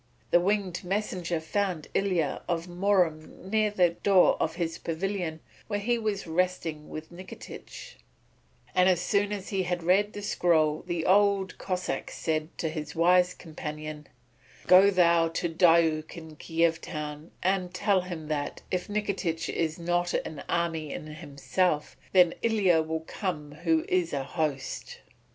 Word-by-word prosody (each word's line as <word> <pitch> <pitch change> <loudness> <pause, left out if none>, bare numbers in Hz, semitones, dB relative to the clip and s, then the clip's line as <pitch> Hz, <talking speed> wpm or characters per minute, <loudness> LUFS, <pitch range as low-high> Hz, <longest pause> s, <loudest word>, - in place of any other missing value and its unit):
The 175 - +6
winged 195 -1 0
messenger 180 -3 -2
found 175 0 -2
Ilya 180 -7 0
of 170 -1 -1
Murom 180 -1 0
near 215 -1 +3
the 180 -4 +3
door 190 +1 +4
of 160 - 0
his 170 -2 -3
pavilion 170 -1 -3 0.3
where 205 -1 -1
he 235 +3 0
was 210 -3 -2
resting 165 -3 -1
with 155 +2 -8
Nikitich, 185 - -10 0.8
and 180 +1 +5
as 180 -2 +3
soon 200 +3 +1
as 200 -2 -4
he 195 -2 0
had 180 -1 -2
read 195 +4 +3
the 205 - -7
scroll 160 -6 +2
the 175 -2 -2
Old 195 0 +3
Cossáck 185 -1 -3
said 155 -1 -2
to 165 - -1
his 155 -1 -5
wise 180 +2 +4
companion: 155 -2 -7 0.6
"Go 190 +2 +7
thou 170 -3 +4
to 165 +1 -2
Diuk 165 -1 +3
in 160 -2 -10
Kiev 165 +1 0
town 150 0 -6
and 185 -1 +1
tell 190 +1 +2
him 175 -4 -7
that, 145 -2 -3
if 180 -1 -1
Nikitich 200 -5 -2
is 160 -1 -1
not 175 +1 0
an 155 -3 -3
army 165 -3 -1
in - - -6
himself, 155 +1 -1 0.2
then 180 -3 +5
Ilya 195 -8 +3
will 160 0 -3
come 160 -4 -4
who 160 +1 0
is 180 -2 +1
a 140 -1 -1
host." 150 -2 -3
175 Hz, 150 wpm, -28 LUFS, 160-190 Hz, 0.8 s, Go